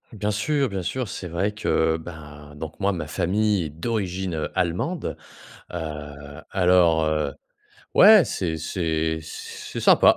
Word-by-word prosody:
Bien 105 -2 -2
sûr, 135 +7 +1
bien 100 -2 -3
sûr. 125 +7 -2
C'est 95 - -6
vrai 95 +5 -1
que, 80 -6 +1
ben, 75 -3 -11
donc 80 +1 -7
moi, 100 +1 +3
ma 85 -6 -4
famille 95 +4 +1
est - - -4
d'origine, 95 +2 -2
heu, 80 - -2
allemande. 90 - -1 0.6
Heu, 75 -3 -7
alors, 90 -4 +4
heu, 75 -2 0 0.6
ouais, 210 -2 +9
c'est 85 -4 -2
c'est 80 -1 -1
c'est 80 - -8
sympa. - - +6
85 Hz, 140 wpm, -24 LUFS, 80-100 Hz, 0.6 s, ouais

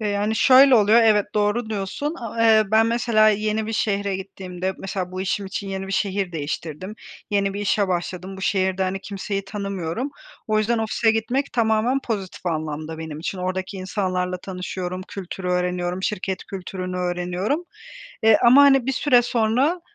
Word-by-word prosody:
E, 215 - -1
yani, 205 +2 0
şöyle 265 +2 +7
oluyor, 220 +1 +5
evet, 210 -2 +4
doğru 210 +2 0
diyorsun. 215 - -3
A 230 -1 -3
eee, 220 -1 +6
ben, 220 +1 +5
mesela, 230 -2 +3
yeni 215 +1 0
bir 225 - -3
şehre 200 -3 0
gittiğimde, 190 -1 -5
mesela, 185 -1 -4
bu 185 - -4
işim 195 +1 -2
için 200 0 -5
yeni 195 0 -4
bir 195 - -5
şehir 195 -2 -1
değiştirdim. 160 +5 -5 0.4
Yeni 200 -1 +1
bir 200 - -3
işe 205 -1 +1
başladım. 180 +1 -3
Bu 190 - -9
şehirde, 190 -1 +1
hani, 190 +1 -2
kimseyi 195 0 -4
tanımıyorum. 200 - -4 0.4
O 215 -1 +1
yüzden 225 +2 +1
ofise 225 +1 +1
gitmek 240 +5 -1
tamamen 230 +3 +2
pozitif 195 -5 -4
anlamda 155 -1 -3
benim 160 -2 -6
için. 185 +3 -4
Oradaki 185 +1 -3
insanlarla 185 -1 -2
tanışıyorum, 185 0 -5
kültürü 190 -1 -6
öğreniyorum, 180 0 -1
şirket 190 -2 -2
kültürünü 185 -1 -6
öğreniyorum. 180 - -2 0.6
E, 220 -1 +7
ama, 255 +4 +7
hani, 270 -3 +5
bir 270 - +1
süre 255 -2 +4
sonra, 245 +8 +1
200 Hz, 165 wpm, -23 LUFS, 185-220 Hz, 0.6 s, şöyle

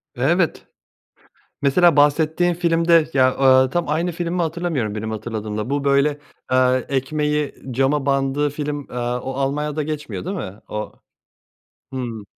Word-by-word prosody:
Evet. 160 +7 +1 1.0
Mesela 155 +3 +4
bahsettiğin 160 +4 +3
filmde 165 -2 +3
ya, 130 -1 +4
aaa, 130 -1 +5
tam 175 -1 0
aynı 170 +3 0
film 170 +1 -3
mi 175 - 0
hatırlamıyorum 160 -10 -2
benim 110 +1 -4
hatırladığımla. 110 +1 -4
Bu, 140 0 -1
böyle, 140 +1 +2 0.3
eee, 130 0 +3
ekmeği 150 +2 -1 0.2
cama 135 +3 +1
bandığı 140 +1 +1
film, 145 0 -3
eee, 125 - -8
o 125 +2 -2
Almanya'da 150 +3 -1
geçmiyor 150 0 -5
değil 195 +2 -3
mi? 100 - -7
O 105 0 -5 1.0
Hıı. 120 -5 -4
145 Hz, 135 wpm, -21 LUFS, 130-160 Hz, 1.0 s, aaa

